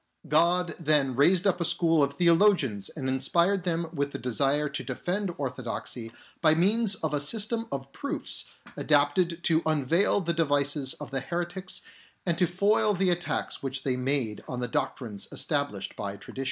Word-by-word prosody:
God 170 +4 +2
then 145 -5 +2
raised 175 +8 +4
up 185 -3 +2
a - - +1
school 165 -2 +3
of 140 0 +1
theologians 170 - +3
and 135 -4 -5
inspired 170 +9 +1
them 170 -1 0
with 140 -2 -2
the - - -3
desire 140 +4 +1
to 140 0 -5
defend 190 +1 -3
orthodoxy 125 -3 -5 0.3
by 155 -1 +5
means 205 +4 +3
of 160 -5 -3
a 145 - 0
system 225 +8 0
of 135 0 -5
proofs 280 - -3 0.3
adapted 165 +4 +1
to 160 -1 +3
unveil 160 +6 +2
the 170 -3 -1
devices 145 -3 +1
of 150 - -9
the 135 - -1
heretics 175 +5 -4 0.4
and 170 -3 +1
to 180 - +4
foil 200 +4 +2
the 185 0 +2
attacks 175 0 -2
which 135 0 -3
they 130 -2 0
made 125 -4 -1
on 125 - -4
the 125 - -2
doctrines 110 -3 -3
established 140 -10 -2
by 100 -1 -5
tradition. 100 - -11
155 Hz, 165 wpm, -27 LUFS, 135-180 Hz, 0.4 s, by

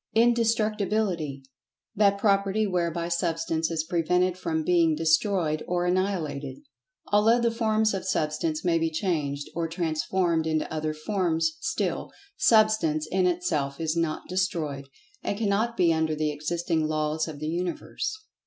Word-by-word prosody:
Indestructibility: 215 - +1 0.5
That 200 -1 +4
property 200 +1 +2
whereby 170 -3 -1
Substance 165 -2 -1
is 165 -2 -1
prevented 180 +2 +1
from 165 -3 -2
being 165 -1 +3
destroyed 160 0 +1
or 175 0 0
annihilated. 175 -7 -1 0.5
Although 220 +3 +5
the 235 -1 +2
forms 220 -2 +1
of 195 - -3
Substance 155 -1 -1
may 165 -2 +3
be 165 0 +1
changed, 155 -5 -2
or 165 0 -1
transformed 165 0 0
into 155 0 -1
other 155 0 -2
forms, 175 - 0
still, 330 0 -2 0.2
Substance 215 -9 +3
in 185 -1 +2
itself 165 -6 -1
is 160 0 -1
not 165 -2 -1
destroyed, 160 -7 -2 0.3
and 200 - -2
cannot 220 +2 0
be 170 -3 +4
under 160 -1 0
the 155 0 0
existing 160 +1 -1
Laws 155 +1 -1
of 155 -2 -7
the 155 +1 -4
Universe. 175 +1 -3
170 Hz, 135 wpm, -26 LUFS, 155-200 Hz, 0.5 s, Although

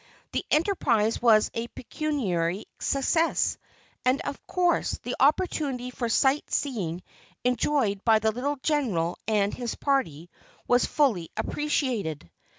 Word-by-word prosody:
The - - -1
enterprise 300 - +2
was 220 -3 +5
a 230 +1 -3
pecuniary 215 - -2
success, 320 +5 +1 0.4
and, 255 +2 +2
of 280 - -6
course, 355 -1 +1
the 245 - -3
opportunity 275 -4 +1
for 240 -2 -3
sight 270 +5 +2
seeing 185 - -2 0.4
enjoyed 245 -4 +1
by 225 -2 +5
the 220 0 +1
little 275 +6 -2
General 210 - 0
and 205 -2 +1
his 240 -2 -4
party 175 - -1 0.4
was 245 0 +4
fully 220 - +1
appreciated. 230 - -2
245 Hz, 120 wpm, -27 LUFS, 205-285 Hz, 0.4 s, was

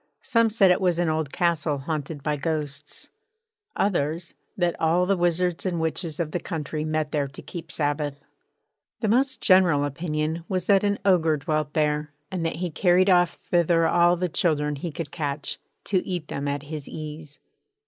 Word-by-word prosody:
Some 230 -1 +3
said 205 -4 +4
it 180 - +2
was 180 -3 +2
an 175 -2 +1
old 155 -2 -1
castle 165 -4 0
haunted 145 0 -4
by 150 0 0
ghosts. 145 -1 -4 0.6
Others, 170 -3 0 0.2
that 175 -2 +1
all 170 +3 +3
the 195 +2 +2
wizards 175 0 +1
and 180 -3 -1
witches 160 0 -2
of 160 -3 -1
the 175 - -1
country 155 -2 -4
met 155 -1 -1
there 145 -2 0
to 140 - -11
keep 170 - -8
Sabbath. 145 -1 -1 0.8
The 220 - +1
most 260 +5 +2
general 180 -7 +5
opinion 155 +2 -2
was 185 -2 -1
that 195 0 +4
an 205 0 +1
Ogre 165 -5 +4
dwelt 150 0 -2
there, 150 -1 0 0.2
and 185 -3 -2
that - - -3
he 175 +1 -3
carried 185 +3 +4
off 175 -1 +4 0.2
thither 170 -1 +3
all 175 0 +4
the 180 +1 -1
children 150 -3 0
he 165 +4 -4
could 150 -1 -6
catch, 150 -4 -3 0.2
to 185 -3 0
eat 175 -5 -4
them 140 +1 -3
at 140 0 -2
his 150 -1 -7
ease. 150 -2 -7
160 Hz, 180 wpm, -25 LUFS, 150-180 Hz, 0.8 s, general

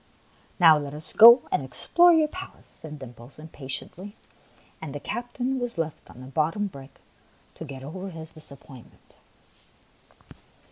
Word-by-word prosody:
" - - -33
Now, 160 -4 +7
let 145 0 -7
us 155 +1 -4
go 235 +3 +9
and - - 0
explore 340 - +3
your 320 -2 +3
palace," 370 +5 -10
said 150 -1 -12
Dimples, 125 -1 -13
impatiently; 160 +6 -7 0.7
and 150 -3 -7
the - - -4
captain 245 - -4
was 245 -5 -5
left 160 -2 -5
on 125 - -14
the - - -10
bottom 155 +9 -1
brick 140 -7 -11 0.5
to 160 - -9
get 135 -3 -10
over 185 +7 -7
his 160 -2 -10
disappointment. 140 -5 -15
160 Hz, 145 wpm, -25 LUFS, 140-205 Hz, 0.7 s, go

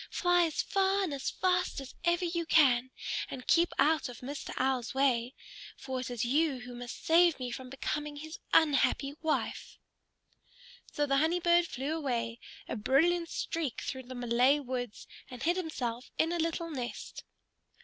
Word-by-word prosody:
Fly 355 -1 +3
as 315 - -1
far 390 0 +2
and 335 -6 -2
as 275 -1 -2
fast 360 -4 0
as 270 -1 -9
ever 345 +1 +2
you 335 -1 -2
can, 260 -6 +4 0.4
and 255 - -7
keep 340 +1 +4
out 310 -3 +3
of 240 - -10
Mr. 280 +3 -6
Owl's 260 -1 0
way. 260 -2 +1 0.4
For 260 -1 -4
it 250 - -4
is 240 -1 -2
you 280 +1 +1
who 245 0 -9
must 245 0 -8
save 335 -1 +5
me 250 -1 -4
from 255 +1 -7
becoming 295 +2 -3
his 315 +3 -8
unhappy 275 -2 +3
wife." 315 -1 -2 1.1
So 295 - 0
the 275 -1 +2
Honey 325 +5 +2
Bird 345 0 +4
flew 275 +4 -3
away, 235 -6 -2 0.3
a - - -3
brilliant 330 +9 +2
streak, 325 -7 -3
through 260 - -4
the 255 - -7
Malay 245 +3 +3
woods, 245 -4 -5 0.2
and 250 0 -8
hid 345 +2 +2
himself 255 -9 -3
in 325 +1 +2
a 345 - -1
little 330 +1 -1
nest. 250 -5 -6
280 Hz, 170 wpm, -31 LUFS, 250-330 Hz, 1.1 s, save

